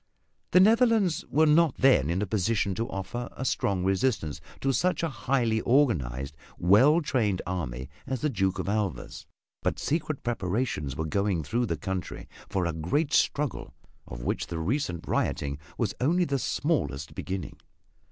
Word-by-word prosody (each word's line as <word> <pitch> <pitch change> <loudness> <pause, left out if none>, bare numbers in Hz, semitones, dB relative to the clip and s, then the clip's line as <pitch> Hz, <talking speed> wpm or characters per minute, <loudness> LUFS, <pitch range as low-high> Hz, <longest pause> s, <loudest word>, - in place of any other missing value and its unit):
The 180 - +5
Netherlands 220 -3 +4
were 155 +2 +4
not 155 -1 +4
then 125 - +4
in 90 +4 0
a - - 0
position 100 0 0
to 115 +5 -3
offer 120 +5 -5
a 130 - -5
strong 95 -6 0
resistance 95 - 0 0.2
to 135 0 +1
such 180 +4 +1
a 165 - +1
highly 120 -4 0
organized, 75 - +1 0.2
well 130 - +5
trained 110 -10 0
army 65 -9 -4 0.2
as 130 -3 -3
the 150 - +1
Duke 95 -4 0
of 95 - -3
Alva's, 100 - -3 0.3
but - - -1
secret 155 -1 -2
preparations 95 - -2
were 80 - -2
going 100 0 0
through 120 - -1
the 85 -4 -2
country 95 +3 -5 0.2
for 95 -2 0
a 85 - -1
great 140 - -1
struggle 145 -1 0 0.3
of - - -8
which - - -2
the 85 - -4
recent 90 - -2
rioting 70 0 -1 0.2
was 110 -5 0
only 175 +7 +3
the 140 -3 -1
smallest 75 - -1
beginning. 95 -3 -5
105 Hz, 160 wpm, -27 LUFS, 85-140 Hz, 0.3 s, The